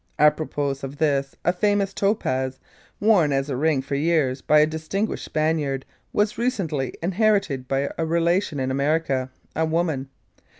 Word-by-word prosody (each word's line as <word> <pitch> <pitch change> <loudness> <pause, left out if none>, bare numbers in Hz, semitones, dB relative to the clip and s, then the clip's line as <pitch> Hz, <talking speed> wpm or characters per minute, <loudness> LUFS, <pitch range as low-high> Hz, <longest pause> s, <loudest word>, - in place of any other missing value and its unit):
Apropos 150 -2 +2
of 135 +1 -6
this, 140 -3 0
a 175 - +3
famous 200 +1 +1
topaz, 130 -12 0 0.4
worn 200 -8 +4
as 135 +1 0
a - - -1
ring 145 0 +1
for 140 - -6
years 145 -3 +1
by 150 - +4
a 150 - +6
distinguished 160 +7 -3
Spaniard 155 -4 -1 0.3
was 210 +2 0
recently 170 - -1
inherited 190 - +1
by 135 +1 0
a 165 - +1
relation 170 -1 +1
in 130 0 -1
America 140 -2 0 0.3
a 160 - +1
woman. 160 -4 -1
155 Hz, 145 wpm, -24 LUFS, 135-175 Hz, 0.4 s, a